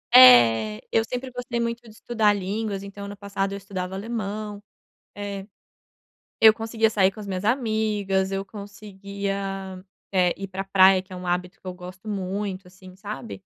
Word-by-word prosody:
É, 115 - +8
eu 225 - +3
sempre 250 +3 -5
gostei 245 -1 -4
muito 235 0 -2
de 235 - -16
estudar 220 -1 +1
línguas, 200 +1 -3
então 200 0 -8
ano 200 0 -8
passado 200 -1 -2
eu - - -4
estudava 190 -1 -5
alemão, 210 -1 -4 0.5
é. 200 -1 -5 0.9
Eu 220 -1 +8
conseguia 225 0 0
sair 195 -3 +3
com 195 - -16
as 205 - -7
minhas 185 -1 -3
amigas, 215 -5 +1
eu 195 0 -2
conseguia, 200 -2 -6 0.3
eh, 180 -2 +3
ir 195 - -5
para 190 0 -4
praia, 190 -1 +6
que 190 +1 -18
é 185 - -7
um 180 0 -7
hábito 180 +1 -2
que - - -18
eu 185 - -3
gosto 180 +3 -11
muito, 195 -1 -3
assim, 185 0 -15
sabe. 210 +4 -7
200 Hz, 170 wpm, -25 LUFS, 190-215 Hz, 0.9 s, É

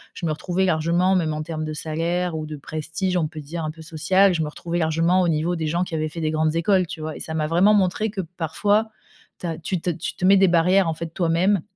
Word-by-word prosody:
je - - -5
me 155 - 0
retrouvais 180 +4 -1
largement, 175 +2 +2
même 160 -4 +1
en 155 0 -3
termes 155 -1 -4
de 155 0 -4
salaire 165 +3 -2
ou 155 -1 -3
de 155 0 -7
prestige, 160 +6 -3
on 165 -3 +1
peut 160 - -8
dire, 160 +3 -6
un 155 - -2
peu 160 +1 -13
social, 185 +4 +3
je 165 - -1
me 150 - -1
retrouvais 170 +3 -4
largement 165 +3 +2
au 180 - +2
niveau 165 +3 0
des 160 -1 -2
gens 170 +3 0
qui 170 - -10
avaient 155 0 -1
fait 165 - -8
des 155 -1 0
grandes 155 0 +1
écoles, 185 +1 +2
tu 160 - -7
vois, 155 0 -5
et - - -8
ça 160 - -5
m'a 155 -1 0
vraiment 180 +6 +4
montré 200 +2 +1
que 200 -2 -3
parfois 185 +6 0 0.5
tu - - -7
as 165 -2 -3
tu 170 +1 -3
te 180 - -1
tu 170 +1 -5
te - - -2
mets 195 +1 +7
des 195 0 +5
barrières, 180 +2 +4
en 160 - 0
fait, 170 +1 -5
toi-même, 175 +2 +2
165 Hz, 270 wpm, -23 LUFS, 155-185 Hz, 0.5 s, mets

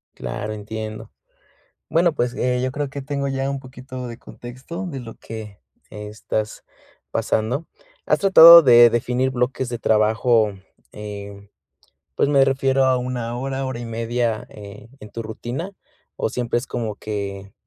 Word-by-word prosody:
Claro, 65 - -5
entiendo. 110 +1 -7 0.8
Bueno, 170 +1 +3
pues, 120 -3 -1
eh, 125 0 0
yo 130 0 -1
creo 145 0 -3
que 140 0 -6
tengo 140 0 -2
ya 135 0 -2
un 140 -1 -3
poquito 130 -1 -8
de 115 -1 -9
contexto 130 +13 -8
de 145 -6 -5
lo 115 -2 -9
que 110 -4 -9 0.3
estás 105 +1 -5 0.5
pasando. 125 +9 -1 0.4
¿Has - - +3
tratado 170 -4 +10
de 120 -3 +8
definir 125 +3 0
bloques 125 0 -1
de 120 -1 -4
trabajo, 110 0 +2 0.4
eh, 100 -1 -9 0.7
pues - - +2
me 140 -2 +5
refiero 135 0 +2
a 130 -1 +3
1 125 -1 -3
hora, 135 +1 -3
hora 130 -2 -4
y - - -6
media, 115 0 -2
eh, 105 +1 -12
en 105 - -11
tu 115 - -6
rutina, 120 - -5 0.5
o - - -1
siempre 120 -1 -1
es 125 - -6
como 110 -3 -3
que 100 -2 -5
120 Hz, 155 wpm, -22 LUFS, 110-135 Hz, 0.8 s, tratado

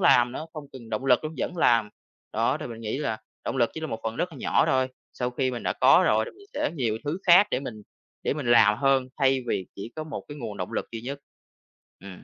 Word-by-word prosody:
làm 120 0 +5
nữa, 155 - -5
không 155 -3 -7
cần 120 -4 -11
động 110 +5 -2
lực 125 +2 +4
luôn, 155 +1 -4
vẫn 180 - -2
làm. 115 -8 +4 0.4
Đó 115 +6 +1
thì 155 - -4
mình 115 -2 -8
nghĩ 110 +4 -3
là 110 -7 -2 0.3
động - - -2
lực 120 -3 +3
chỉ 160 - -5
là 160 - -3
một 115 -6 -5
phần 115 0 -3
rất 180 - -1
là - - -10
nhỏ - - +2
thôi, 130 0 +2 0.2
sau 125 -1 -2
khi 130 +1 0
mình 120 -2 -5
đã - - 0
có - - +6
rồi 110 +1 +3
thì - - -8
mình 400 +2 -18
sẽ 295 +1 0
nhiều 115 -7 -1
thứ 155 +5 -2
khác 180 +4 +8
để - - 0
mình 110 -6 -7 0.4
để - - 0
mình 150 -4 -4
làm 110 -3 +6
hơn, 135 -2 +3
thay 135 -1 +3
vì 95 -5 -1
chỉ 105 +4 -7
có 155 - -4
một 155 - -6
cái 145 - -8
nguồn 110 -6 -5
động 90 - -5
lực - - -2
duy 115 - -4
nhất. 140 +4 -5 0.8
Ừm. 100 - -10
130 Hz, 265 wpm, -26 LUFS, 115-145 Hz, 0.8 s, khác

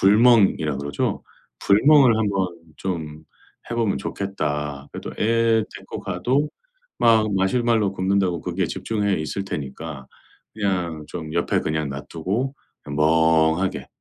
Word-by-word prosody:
불멍이라 100 - +4
그러죠. 70 0 -2 0.4
'불멍을 130 +3 +6
한번 100 -4 +1 0.3
좀 80 -4 -5 0.5
해 120 - -2
보면 115 -4 +1
좋겠다.' 75 -7 -3
그리고 - - -6
또 - - -4
애 115 0 +3
데리고 - - -8
가도 130 +11 0 0.5
막 110 -3 +4
마시멜로 110 +1 +2
굽는다고 95 -2 0
거기에 90 0 -1
집중해 105 +2 -1
있을 80 +5 -3
테니까 70 -3 -6 0.5
그냥 90 -7 -2
좀 80 -3 -6
옆에 85 - +1
그냥 75 -1 -2
놔 70 +1 -5
두고 105 - -2 0.3
그냥 70 0 -6
'멍하게 80 +3 +2
95 Hz, 275 characters per minute, -23 LUFS, 80-110 Hz, 0.5 s, 불멍을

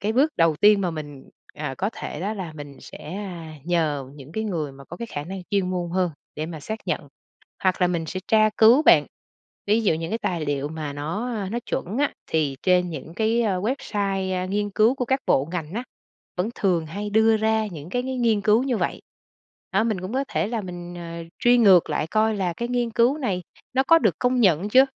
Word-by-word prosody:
cái 215 +2 0
bước 290 +6 +3
đầu 165 -2 +3
tiên 205 +3 +5
mà 180 - 0
mình, 145 -4 -8 0.3
à, 150 -3 -4
có 200 +3 0
thể 150 - -6
đó 200 +4 -1
là 185 -6 -6
mình 145 -2 -10
sẽ 160 +5 -9 0.5
nhờ 155 -6 0
những 145 +1 -12
cái 220 +3 -2
người 160 -8 -2
mà 135 0 -13
có 175 - -9
cái 235 - -5
khả 145 -9 -5
năng 190 +4 -6
chuyên 195 -3 +1
môn 175 -2 -2
hơn 180 0 +1 0.2
để 155 +1 -3
mà 160 -2 -7
xác 220 +9 -5
nhận, - - -2 0.5
hoặc 185 -1 +1
là 180 - +5
mình 170 -2 -1
sẽ 185 - -4
tra 215 -1 +5
cứu, 235 +6 +7
bạn, - - +6 0.6
ví 215 +3 +3
dụ 180 - +3
những 165 +1 -4
cái 225 - -1
tài 170 -8 -2
liệu 145 0 -1
mà 155 -2 -5
nó, 160 +11 -3
a, 200 -3 -3
nó 235 - 0
chuẩn 205 +8 -3
á, 290 - +2
thì 150 -4 0
trên 180 -1 +3
những 155 +1 -7
cái 220 +4 +1
website, 195 -2 -1
a, 185 0 -1
nghiên 205 +2 -1
cứu 220 +5 +3
của 250 - -2
các 265 +2 +1
bộ 135 +3 +2
ngành 165 -2 -4
á, 240 +3 -3 0.5
vẫn 185 +5 -1
thường 175 -5 +1
hay 205 +6 -5
đưa 220 +1 +4
ra 220 0 +1
những 165 -4 -8
cái 245 +3 0
cái 260 0 -3
nghiên 230 -4 +2
cứu 215 +3 +4
như 260 -3 0
vậy. - - -2 0.7
Đó, 195 +3 +3
mình 215 -5 -1
cũng 185 +4 -6
có 270 +2 0
thể 210 - -1
là 230 -1 -2
mình, 175 -2 -7
ờ, 170 -1 -7
truy 245 0 +5
ngược 190 -8 +6
lại 150 0 0
coi 215 +2 +2
là 185 -3 0
cái 235 +5 -4
nghiên 245 -1 0
cứu 240 +6 +3
này 195 -10 -1 0.3
nó 265 - +3
có 330 +3 +6
được 215 - +2
công 250 0 +2
nhận 190 -2 +3
chưa? 260 +5 +7
190 Hz, 230 wpm, -24 LUFS, 165-220 Hz, 0.7 s, cứu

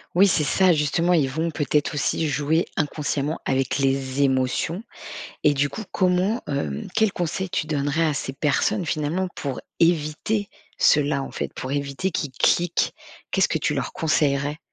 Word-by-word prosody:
Oui, 195 +3 +6
c'est 165 -5 +2
ça, 185 +5 +4
justement. 160 +4 +1
Ils 150 -6 +3
vont 160 +5 -1
peut-être 150 0 0
aussi 150 +2 0
jouer 150 +3 +1
inconsciemment 150 0 -1
avec 135 -1 0
les 135 0 0
émotions. 135 - +1 0.6
Et 150 - +6
du 140 +1 +1
coup, 180 +10 -6
comment, 185 +5 +1
hem 75 - -3
quels 220 -3 +3
conseils 180 +2 -2
tu 170 -4 -1
donnerais 145 +2 0
à 155 - 0
ces 135 - -3
personnes, 160 +7 0
finalement, 155 +6 -1
pour 135 -3 -4 0.2
éviter 170 +5 +1 0.3
cela, 145 -1 +3
en - - -6
fait, - - -4
pour 130 - -5
éviter 140 +6 -2
qu'ils 145 -4 -3
cliquent? 175 +6 +2 0.4
Qu'est-ce - - +3
que - - 0
tu - - 0
leur - - -2
conseillerais? 145 -1 +1
150 Hz, 165 wpm, -24 LUFS, 140-175 Hz, 0.6 s, Oui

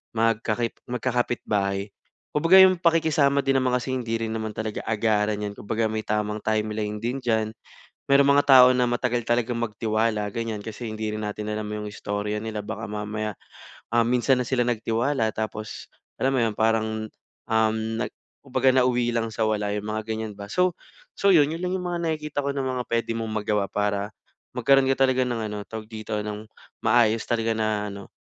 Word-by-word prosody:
magka 115 -1 +1 0.3
magkakapitbahay. 110 -5 -1 0.4
Kumbaga 165 +5 +5
yung 185 -2 +2
pakikisama 155 -5 +3
din 135 - +3
naman 125 -1 +2
kasi 130 +1 -4
hindi 115 -3 -1
rin 110 - -3
naman 110 -1 -4
talaga 110 -1 -3
agaran 105 -1 +1
yan, 105 -1 -4
kumbaga 110 +2 -2
may 110 0 -1
tamang 105 0 -2
timeline 105 -1 -1
din 120 +5 -3
diyan. 110 -2 0 0.5
Merong 140 0 +5
mga 145 - +4
tao 130 -2 +9
na 125 -1 +3
matagal 120 -1 -1
talagang 120 0 0
magtiwala, 110 -1 -1
ganyan. 110 -1 -4
Kasi 115 +2 -7
hindi 110 0 -3
rin 105 0 -3
natin 105 +1 -4
alam 105 0 -3
yung 105 0 -5
istorya 105 0 -3
nila, 105 -1 -4
baka 105 - -5
mamaya, 105 0 -4 0.6
ah, 120 - +4
minsan 125 +2 +2
na 125 - -3
sila 125 -2 +2
nagtiwala 115 +1 0
tapos 110 0 -5 0.2
alam 135 - +1
mo 130 - +2
yun 115 -2 0
parang 110 0 +1 0.4
um 110 0 +2 0.2
nag - - -1 0.3
kumbaga 130 -1 +2
nauwi 125 -2 +2
lang 115 -1 0
sa 110 0 -1
wala 105 -1 0
yung 105 - -4
mga 110 - -1
ganyan 110 -1 -3
ba. 100 0 -9
So 180 - +2 0.4
so 200 - +1
yun, 150 0 +4
yun 165 - -5
lang 180 +1 -1
yung 180 - -5
mga 175 -1 -2
nakikita 155 -3 -2
ko 140 0 -2
na 135 - -1
mga 130 -1 -2
pwede 115 0 0
mong 110 -2 -3
magawa 105 -2 0
para 105 0 -1 0.5
magkaroon 135 -1 +4
ka 135 0 +3
talaga 130 -1 +2
ng 120 -2 -2
ano, 105 - -4
tawag 110 -1 -6
dito, 110 -1 -5
ng 105 +1 -6 0.3
maayos 115 -1 +3
talaga 115 -1 +1
na 110 -2 -1
ano, 100 -1 -9
110 Hz, 185 wpm, -25 LUFS, 105-125 Hz, 0.6 s, tao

